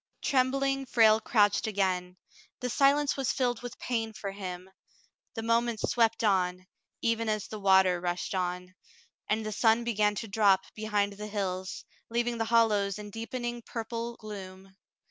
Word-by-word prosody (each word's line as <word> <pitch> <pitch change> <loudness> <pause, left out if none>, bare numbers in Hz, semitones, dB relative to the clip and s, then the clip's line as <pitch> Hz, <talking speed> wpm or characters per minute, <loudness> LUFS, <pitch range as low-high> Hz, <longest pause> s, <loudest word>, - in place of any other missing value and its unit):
Trembling, 270 0 +1
Frale 220 -3 +5
crouched 210 -1 +2
again. 185 -3 -1 0.4
The 250 -1 -3
silence 280 +2 +3
was 270 -2 0
filled 245 -3 -1
with 245 0 -7
pain 225 -3 -2
for 200 -2 -5
him. 185 -2 -7 0.7
The 225 - -4
moments 230 -1 +1
swept 230 -1 +2
on, 185 -3 +1 0.4
even 230 -1 +1
as 215 -2 -1
the 215 - -7
water 190 -2 +4
rushed 175 +3 -2
on, 180 0 -3 0.6
and 215 +1 0
the 215 - -3
sun 225 +2 +3
began 210 -3 +1
to 225 - -4
drop 195 -2 +3
behind 210 -2 -1
the 210 +1 -7
hills, 190 -3 -4 0.2
leaving 235 0 -1
the 225 - +1
hollows 215 -4 +2
in 210 -1 -8
deepening 240 +2 -4
purple 230 +1 -5
gloom. 190 -3 -10
215 Hz, 150 wpm, -29 LUFS, 195-235 Hz, 0.7 s, Frale